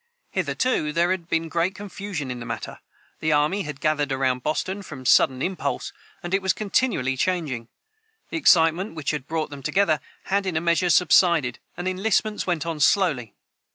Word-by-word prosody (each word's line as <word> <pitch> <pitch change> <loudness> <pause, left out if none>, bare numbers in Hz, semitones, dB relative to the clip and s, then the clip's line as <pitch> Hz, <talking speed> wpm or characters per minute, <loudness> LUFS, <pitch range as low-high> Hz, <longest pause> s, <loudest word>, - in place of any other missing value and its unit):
Hitherto 205 -12 0
there 170 +3 +2
had 175 -3 -3
been 165 0 0
great 170 +4 0
confusion 195 -8 -5
in 125 - -5
the 115 - -7
matter. 115 -1 -6 0.4
The 155 - 0
army 150 +7 +2
had 150 -5 -6
gathered 150 -2 0
around 130 -1 0
Boston 185 +8 -2
from 140 -9 -10
sudden 130 +1 +4
impulse, 145 -9 -3 0.3
and 175 +1 -5
it 195 - +2
was 190 0 +2
continually 200 - 0
changing. 140 -8 -1 0.6
The - - -2
excitement 170 - +4
which 155 -4 -2
had 150 -3 -5
brought 160 -2 -2
them 140 -1 -8
together 160 0 +2 0.2
had 195 0 0
in 170 -4 -1
a - - +3
measure 170 +2 +1
subsided, 170 -7 +4 0.2
and 175 +1 -3
enlistments 210 +3 0
went 170 -4 0
on 165 -2 -3
slowly. 140 - +2
165 Hz, 175 wpm, -24 LUFS, 145-190 Hz, 0.6 s, sudden